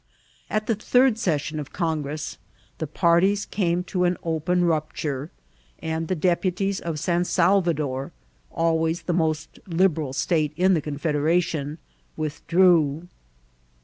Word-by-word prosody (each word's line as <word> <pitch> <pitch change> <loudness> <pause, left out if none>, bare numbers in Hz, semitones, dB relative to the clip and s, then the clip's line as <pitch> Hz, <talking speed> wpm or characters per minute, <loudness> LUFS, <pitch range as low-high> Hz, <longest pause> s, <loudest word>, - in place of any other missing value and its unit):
At 215 0 -1
the 225 - +1
third 245 +2 +3
session 155 -6 -1
of 145 -2 -7
Congress 155 -3 -3 0.4
the 160 - -2
parties 175 +6 +2
came 180 -3 0
to 180 0 -1
an 175 0 +1
open 175 +2 +1
rupture, 155 -3 -2 0.5
and 160 0 -3
the 185 - 0
deputies 185 +3 0
of 165 -2 -4
San 175 +2 +1
Sal 185 +2 +3
vador, 145 -6 -2 0.4
always 165 +1 0
the 175 - -1
most 160 -2 -1
Liberal 165 -6 +1
state 155 +1 0
in 185 +2 +4
the 165 - +2
confedera 150 +3 +1
cy, 155 -3 -3 0.4
withdrew. 165 0 +2
165 Hz, 130 wpm, -24 LUFS, 155-180 Hz, 0.5 s, in